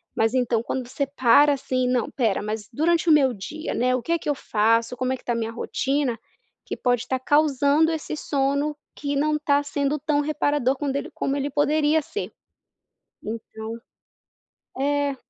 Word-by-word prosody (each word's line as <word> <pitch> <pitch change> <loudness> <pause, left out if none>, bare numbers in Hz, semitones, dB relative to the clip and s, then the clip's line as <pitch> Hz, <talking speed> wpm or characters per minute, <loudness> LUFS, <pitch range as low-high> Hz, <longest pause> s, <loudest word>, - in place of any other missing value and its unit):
mas 225 +1 +2
então 245 -3 +1
quando 250 +1 -4
você 275 +2 -2
para, 280 +2 +5
assim, 255 -2 -1
não 250 -2 +1
espera 225 -7 0
mas 210 0 -4
durante 330 +6 +1
o - - +8
meu 270 -4 +4
dia, 300 - -6
né, 255 +1 +1
o 255 - -2
que - - -3
é 335 - +2
que - - -4
eu 290 - +1
faço? 230 0 +1
Como 255 +1 0
é - - 0
que 255 - -15
está - - -2
a - - -2
minha 225 -1 -2
rotina? 265 +1 -1 0.5
Que - - -3
pode 245 -2 +1
estar 260 - -2
causando 290 +2 +3
esse 315 -1 -4
sono 280 +1 0 0.2
que 285 -1 -3
não 300 +2 +1
está 290 -1 +2
sendo 290 0 -1
tão 290 +1 +1
reparador 290 -3 +1
quando 275 -1 -2
ele 280 - -3
como 275 - -1
ele 280 0 -1
poderia 300 +2 +2
ser 420 +8 -5 0.9
então 220 0 -6 1.0
É. 285 0 +1
275 Hz, 185 wpm, -24 LUFS, 245-295 Hz, 1.0 s, o